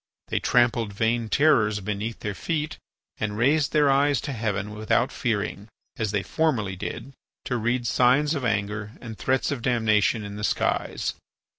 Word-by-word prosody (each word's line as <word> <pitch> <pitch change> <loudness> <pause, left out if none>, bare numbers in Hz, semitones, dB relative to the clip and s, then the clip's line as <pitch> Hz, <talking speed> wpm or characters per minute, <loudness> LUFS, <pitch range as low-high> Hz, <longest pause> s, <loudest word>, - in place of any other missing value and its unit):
They - - 0
trampled 120 -3 +2
vain 115 +2 0
terrors 110 -6 +3
beneath 105 +3 -4
their 105 - -3
feet 155 +6 -3 0.4
and 105 -1 -2
raised 145 +5 +3
their 145 -2 +4
eyes 140 -1 +3
to 145 - -4
heaven 105 -3 -2
without 110 +4 +1
fearing, 105 -3 -2 0.3
as 110 -2 -1
they 100 -1 -1
formerly 115 -12 0
did, 115 +7 -6 0.3
to 125 - -1
read 120 +2 0
signs 130 +6 +3
of 140 -4 -3
anger 105 -1 -1
and 115 -3 -8
threats 130 +5 0
of 140 -4 -3
damnation 110 -2 +2
in 100 0 -7
the 105 - -6
skies. - - 0
115 Hz, 160 wpm, -25 LUFS, 105-130 Hz, 0.4 s, their